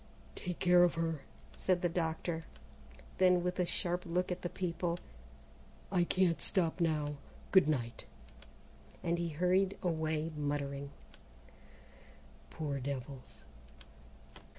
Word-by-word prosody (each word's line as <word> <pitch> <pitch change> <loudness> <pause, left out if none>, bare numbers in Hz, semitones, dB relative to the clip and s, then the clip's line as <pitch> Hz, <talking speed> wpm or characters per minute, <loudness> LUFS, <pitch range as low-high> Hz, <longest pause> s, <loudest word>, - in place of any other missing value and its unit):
"Take 180 -2 -4
care 180 -1 +6
of 175 -1 +4
her," 165 -3 -1 0.3
said 180 -1 +1
the - - +5
doctor, 165 -1 -2 0.7
then 180 -1 +5
with 180 +1 -1
a 180 - +2
sharp 180 0 0
look 180 +2 -1
at 180 - -3
the 175 - -2
people: 175 -1 -2 0.9
"I 180 -3 +3
can't 180 -2 +2
stop 175 -3 +1
now 150 -3 +1 0.3
goodnight!" 150 -11 +3 1.0
and 170 0 +1
he 170 -1 -1
hurried 185 +5 +2
away 160 -2 0
muttering, 140 -1 -2 1.6
"Poor 145 -3 -3
devils!" 130 0 -6
170 Hz, 110 wpm, -34 LUFS, 150-180 Hz, 1.6 s, care